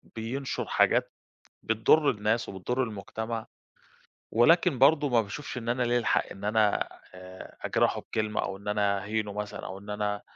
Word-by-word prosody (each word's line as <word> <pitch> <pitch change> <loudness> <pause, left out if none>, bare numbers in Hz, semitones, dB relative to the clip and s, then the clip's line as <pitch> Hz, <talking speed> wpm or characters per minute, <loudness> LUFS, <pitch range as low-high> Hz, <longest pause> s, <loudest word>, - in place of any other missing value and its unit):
بينشُر 125 +5 -3
حاجات - - +2 0.5
بتضُرّ 115 +7 +4
الناس، 110 +3 0
وبتُضّر 120 +7 -2
المجتمع، 110 +1 -5 0.9
ولكن 160 +4 +4
برضه 145 +2 +5
ما 120 -2 +4
باشوفش 120 +6 -7
إن 120 -1 -4
أنا 125 +1 +1
لِيَّا 120 0 +2
الحق 115 - +1
إن 100 - -10
أنا 105 0 +2 0.3
آآ، 95 0 -11
أجْرَحُه - - +1
بكلمة، 105 -1 -2
أو 95 - -4
إن 100 - -13
أنا 100 -1 +1
أهينُه 105 0 -2
مثلًا، 105 0 -5
أو 95 - -6
إن 100 +1 -13
أنا 105 0 -2
110 Hz, 155 wpm, -28 LUFS, 105-120 Hz, 0.9 s, برضه